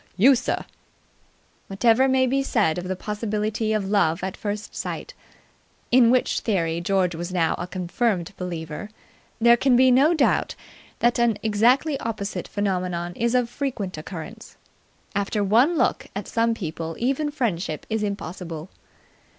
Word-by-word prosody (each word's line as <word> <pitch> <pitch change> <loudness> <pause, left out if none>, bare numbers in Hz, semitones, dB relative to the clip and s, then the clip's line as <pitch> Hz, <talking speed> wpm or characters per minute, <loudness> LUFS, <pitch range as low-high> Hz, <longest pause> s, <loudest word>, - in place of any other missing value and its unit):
"You, 255 +8 +7
sir!" 255 - -1 1.0
Whatever 230 +6 +3
may 260 0 +3
be 270 +2 +1
said 210 - +1
of 180 - -6
the 190 - -2
possibility 215 +2 -2
of 210 -3 0
love 180 -5 +1
at 190 0 -3
first 205 0 -5
sight, - - -5 0.8
in 240 -1 +6
which 255 +1 +2
theory 170 -6 -1
George 185 -1 +1
was 170 +2 -5
now 170 -3 +1
a 175 - -4
confirmed 185 +1 -1
believer, 170 +1 -6 0.5
there 235 +1 +6
can 255 +1 +3
be 255 +1 +6
no 285 +7 +5
doubt 290 - +1 0.5
that 240 0 +3
an 235 -3 +2
exactly 245 +7 +2
opposite 215 -3 -4
phenomenon 180 -3 -2
is 235 +1 0
of 250 -2 +2
frequent 240 -7 -4
occurrence. 160 +7 -9 0.6
After 205 +1 -1
one 240 - +3
look - - +1
at - - -4
some 230 0 +1
people 165 -4 -5
even 275 +5 0
friendship 200 - -2
is 220 0 -1
impossible. 180 -4 -5
210 Hz, 145 wpm, -24 LUFS, 180-240 Hz, 1.0 s, You